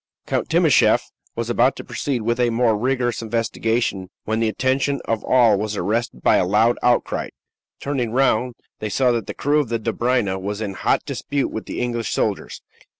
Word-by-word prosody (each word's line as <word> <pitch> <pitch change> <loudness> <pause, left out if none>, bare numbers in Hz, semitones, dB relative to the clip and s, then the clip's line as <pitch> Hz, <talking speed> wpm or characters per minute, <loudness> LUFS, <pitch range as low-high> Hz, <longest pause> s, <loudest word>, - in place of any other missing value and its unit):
Count - - -2
Timascheff - - +3 0.2
was 115 -1 -3
about 125 +3 +3
to - - -8
proceed 130 -6 -3
with 120 +2 0
a 120 -1 +3
more 115 -1 +2
rigorous 120 +1 -1
investigation, 115 -3 -1 0.2
when 110 +1 -1
the 115 - +2
attention 135 +4 0
of 115 -1 -1
all 115 -6 +4
was 105 0 -3
arrested 105 - -2
by - - +5
a - - +3
loud 110 +6 +2
outcry. 120 -1 +1 0.5
Turning 130 -5 -2
round, 125 -1 +1 0.2
they 110 - -3
saw 125 +4 +2
that 115 -4 -2
the - - -5
crew 145 +2 +1
of 140 -6 -1
the 115 - 0
Dobryna 115 -3 0
was 100 +2 -4
in 105 -3 -3
hot - - 0
dispute 140 -1 -2
with 110 - -6
the - - -5
English 120 -3 -2
soldiers. - - -2
115 Hz, 185 wpm, -21 LUFS, 110-125 Hz, 0.5 s, by